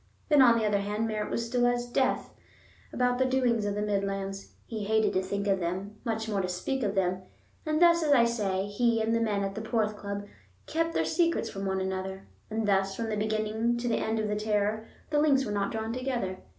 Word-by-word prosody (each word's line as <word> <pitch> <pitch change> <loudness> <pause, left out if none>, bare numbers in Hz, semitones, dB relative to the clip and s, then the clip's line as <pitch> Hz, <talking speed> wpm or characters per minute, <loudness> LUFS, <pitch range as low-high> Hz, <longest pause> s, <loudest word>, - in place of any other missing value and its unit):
Then, 295 -3 +6
on 235 -2 +7
the 225 - 0
other 205 -1 +2
hand, 210 +3 -1
Merritt 215 -1 -2
was - - -1
as 230 - -4
still 245 +1 +2
as 245 0 0
death 255 +2 0 0.6
about 250 0 +1
the 260 - +3
doings 250 -4 +1
of 205 0 -1
the 210 - -1
Midlands; 195 -1 -2
he 220 -2 -5
hated 220 +1 +2
to 185 - +2
think 200 +2 -3
of 195 -1 +2
them, 190 +4 -4
much 225 -2 -2
more 205 -3 0
to 185 - -2
speak 185 +10 -2
of 205 -3 -1
them; 185 -1 +1 0.5
and 310 0 +1
thus, 340 0 +6
as 305 -2 +1
I 245 -4 +6
say, 200 -5 0
he 230 +3 +1
and 225 +1 +1
the 230 - +2
men 205 -3 0
at 195 0 -2
the 220 - -5
Porth 220 -1 0
Club 200 0 -5 0.4
kept 330 +1 -1
their - - +2
secrets 335 -1 +1
from 195 0 -4
one 190 0 0
another; 190 0 -4 0.2
and 220 0 -1
thus, 195 -1 +2
from 225 +1 -3
the 215 - -1
beginning 215 +2 0
to 240 +1 -3
the 235 - +1
end 220 +1 -1
of 215 -1 0
the 210 - -1
terror, 210 +1 0 0.2
the 295 - +3
links 280 -3 +3
were 210 - -3
not 200 -1 -1
drawn 220 0 -3
together. 245 -8 -2
215 Hz, 235 wpm, -29 LUFS, 200-240 Hz, 0.6 s, on